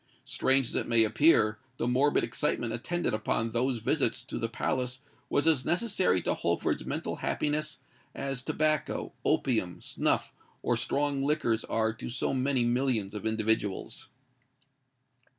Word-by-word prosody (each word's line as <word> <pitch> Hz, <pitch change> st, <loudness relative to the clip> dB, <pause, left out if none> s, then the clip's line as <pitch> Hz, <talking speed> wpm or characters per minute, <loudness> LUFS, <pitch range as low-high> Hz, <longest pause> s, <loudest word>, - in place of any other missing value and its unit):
Strange 135 Hz, 0 st, +2 dB
as -, -, -6 dB
it -, -, 0 dB
may 115 Hz, -1 st, +5 dB
appear, 110 Hz, -2 st, +4 dB, 0.2 s
the 115 Hz, -, -1 dB
morbid 135 Hz, +4 st, +3 dB
excitement 115 Hz, 0 st, -1 dB
attendant 175 Hz, +6 st, -2 dB
upon 110 Hz, +1 st, -1 dB
those 125 Hz, +2 st, 0 dB
visits 110 Hz, -, 0 dB
to -, -, -5 dB
the -, -, -1 dB
palace 130 Hz, 0 st, -2 dB, 0.3 s
was 145 Hz, -, +1 dB
as 155 Hz, -5 st, +4 dB
necessary 175 Hz, -, +1 dB
to -, -, +1 dB
Holford's -, -, -1 dB
mental -, -, -3 dB
happiness 150 Hz, 0 st, -1 dB, 0.4 s
as 135 Hz, -2 st, -3 dB
tobacco, 155 Hz, +3 st, -1 dB
opium, 100 Hz, -9 st, +1 dB
snuff, -, -, -1 dB, 0.3 s
or 120 Hz, -, +2 dB
strong 140 Hz, +4 st, 0 dB
liquors 140 Hz, -6 st, +1 dB
are 110 Hz, 0 st, 0 dB
to 110 Hz, -, -7 dB
so 120 Hz, +2 st, -1 dB
many 130 Hz, -1 st, +1 dB
millions 120 Hz, -5 st, 0 dB
of 105 Hz, +1 st, -3 dB
individuals. 110 Hz, -2 st, -1 dB
125 Hz, 140 wpm, -29 LUFS, 110-140 Hz, 0.4 s, may